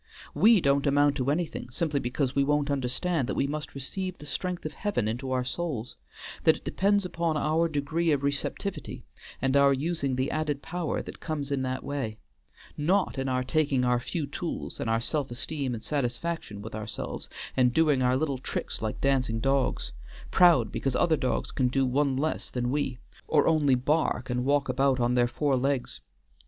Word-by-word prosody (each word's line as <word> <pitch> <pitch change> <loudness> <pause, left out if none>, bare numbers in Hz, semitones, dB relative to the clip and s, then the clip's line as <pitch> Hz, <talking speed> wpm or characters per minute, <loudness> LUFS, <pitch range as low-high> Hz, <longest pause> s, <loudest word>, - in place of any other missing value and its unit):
We 220 -3 +6
don't 140 0 +2
amount 145 0 +4
to 130 0 0
anything, 155 -3 -2
simply 145 +3 -1
because 130 +1 -1
we 140 - +3
won't 145 0 +1
understand 135 +2 0
that - - -1
we - - +1
must 150 +1 -5
receive 185 +7 -3
the 150 - -11
strength 180 +3 -3
of 155 - -4
Heaven 195 - -1
into 125 +4 -3
our 130 -1 +1
souls; 130 -3 -3 0.5
that - - +6
it - - -19
depends 200 0 +2
upon 170 -3 -1
our 160 +3 +2
degree 160 +2 0
of 140 -2 +1
receptivity, 145 +7 -3 0.4
and 135 0 +2
our 140 0 +6
using 140 -1 -1
the 130 +1 -1
added 150 -2 -2
power 175 -2 -2
that - - -9
comes 145 -3 -4
in 140 -1 0
that 130 0 -2
way; 135 -7 -3 0.6
not 175 0 +1
in 135 0 -1
our 130 0 0
taking 140 -2 +1
our 125 0 +3
few 155 +5 -3
tools, 165 +4 -5
and 115 - -2
our 115 0 +2
self 145 +2 0
esteem 130 +1 -2
and 110 - -8
satisfaction 140 -5 -2
with 110 - -8
ourselves, 110 -1 -5 0.3
and 125 -1 +4
doing 150 -1 +3
our 125 0 +3
little 140 -3 -1
tricks - - -3
like 110 -1 -3
dancing 130 -5 +1
dogs; 135 +2 0 0.4
proud 165 - +5
because 135 - -1
the - - 0
other 170 -2 +4
dogs 130 -4 -1
can 130 - +1
do 135 +2 +1
one 135 +1 +1
less 155 +3 -1
than 120 -1 -2
we, 140 -3 -1 0.3
or 150 -2 +3
only 150 -5 +4
bark 130 -1 0
and 125 0 -1
walk 140 0 +2
about 135 +1 +2
on 120 0 +2
their 120 -1 +3
four 140 +2 0
legs. 135 0 -1
140 Hz, 190 wpm, -28 LUFS, 130-155 Hz, 0.6 s, We